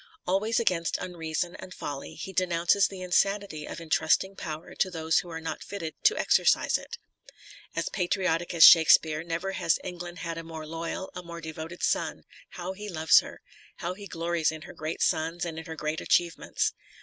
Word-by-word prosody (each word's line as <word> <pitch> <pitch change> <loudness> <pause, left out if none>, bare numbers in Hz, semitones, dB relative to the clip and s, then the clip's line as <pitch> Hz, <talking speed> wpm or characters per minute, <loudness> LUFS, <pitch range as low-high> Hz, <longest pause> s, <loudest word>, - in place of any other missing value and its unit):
Always 210 +5 +1
against 180 -7 +1
unreason 175 -1 -3
and 185 -1 -10
folly, 140 -1 -6
he 190 - -7
denounces 180 +2 +3
the 190 -2 -9
insanity 195 -3 0
of - - -6
entrusting 165 +4 +1
power 155 -2 -6
to 190 - +1
those 160 -2 +1
who 175 - -7
are 160 -1 -5
not 160 0 -5
fitted 170 -6 -5
to 440 - +5
exercise - - +3
it. - - -4 0.8
As - - -1
patriotic 175 -2 0
as 165 - +7
Shake 165 -2 +10
speare, 155 0 +5
never 170 +3 -3
has 165 -3 +1
England 175 -1 -7
had 165 -1 -4
a - - -7
more 160 -1 -8
loyal, 165 +4 -5
a 180 - -6
more 170 -1 -8
devoted 160 +1 -7
son - - 0 0.2
— - - -16
^how 180 +1 -4
he 210 +1 -7
loves 160 -3 +5
her! - - -9 0.3
how 175 +2 -4
he 200 +2 -10
glories 165 -2 0
in 160 0 -8
her - - -10
great 155 +1 -3
sons 165 +2 0
and 165 -2 -5
in 160 - -9
her 160 - -6
great 155 0 -3
achieve 170 -1 +2
ments. - - -1
170 Hz, 195 wpm, -28 LUFS, 160-185 Hz, 0.8 s, Shake